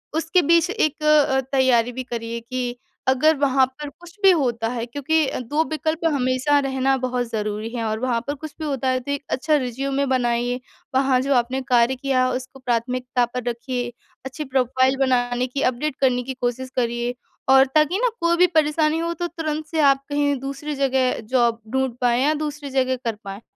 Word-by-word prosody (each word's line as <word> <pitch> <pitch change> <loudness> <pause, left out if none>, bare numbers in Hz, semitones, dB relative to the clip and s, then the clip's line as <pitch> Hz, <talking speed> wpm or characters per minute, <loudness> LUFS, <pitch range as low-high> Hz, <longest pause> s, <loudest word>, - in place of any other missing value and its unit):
उसके 330 +3 +2
बीच 335 +2 +3
एक 310 -7 -1
अ, 300 -3 +4
तैयारी 250 -3 +3
भी 255 +1 -5
करिए 235 -1 -5
कि 245 +1 -4 0.3
अगर 300 +5 +4
वहाँ 270 -2 +3
पर 285 +3 -9
कुछ 345 +6 -16
भी 385 - +8
होता 240 -8 0
है 235 -1 -3
क्योंकि 290 +5 0
अ, - - -3
2 290 +6 0
विकल्प 315 +1 -1
हमेशा 260 +2 +2
रहना 270 0 +1
बहुत 250 -1 -1
ज़रूरी 215 0 -3
है 230 - -2
और 220 0 -2
वहाँ 245 -2 0
पर 285 - -1
कुछ 310 +1 -9
भी 315 - -4
होता 270 -3 -2
है 255 0 +1
तो 280 +3 -6
एक 285 0 -3
अच्छा 305 +4 +1
रिज़्यूमे 270 +1 -1
बनाइए। 245 -1 0 0.4
वहाँ 265 -1 +3
जो 275 +1 +1
आपने 250 +2 0
कार्य 245 +1 +4
किया 255 -1 +1
उसको 260 +1 -6
प्राथमिकता 250 +1 0
पर 250 0 -5
रखिए, 245 +1 -4 0.3
अच्छी 265 +4 -5
प्रोफ़ाइल 260 0 +1
बनाने 250 -1 +1
की 275 +3 -4
अपडेट 265 +3 -3
करने 250 -2 +2
की 265 +1 -5
कोशिश 250 +1 -2
करिए 240 0 -1 0.4
और 265 0 +7
ताकि 310 +5 +3
ना - - +2
कोई 340 0 +3
भी 360 +1 +6
परेशानी 310 -1 +2
हो 335 0 -1
तो 345 +1 -3
तुरंत 310 -2 -4
से 320 +1 -3
आप 275 -1 +4
कहीं 285 0 +1
दूसरी 275 +3 -5
जगह 265 -2 +1
जॉब 235 -2 +2
ढूँढ़ 265 -1 +1
पाएँ 245 +1 +2
या 305 +2 +3
दूसरी 295 -1 -5
जगह 260 -1 +1
कर 230 - -1
पाएँ। 195 +2 -7
265 Hz, 195 wpm, -22 LUFS, 245-290 Hz, 0.4 s, भी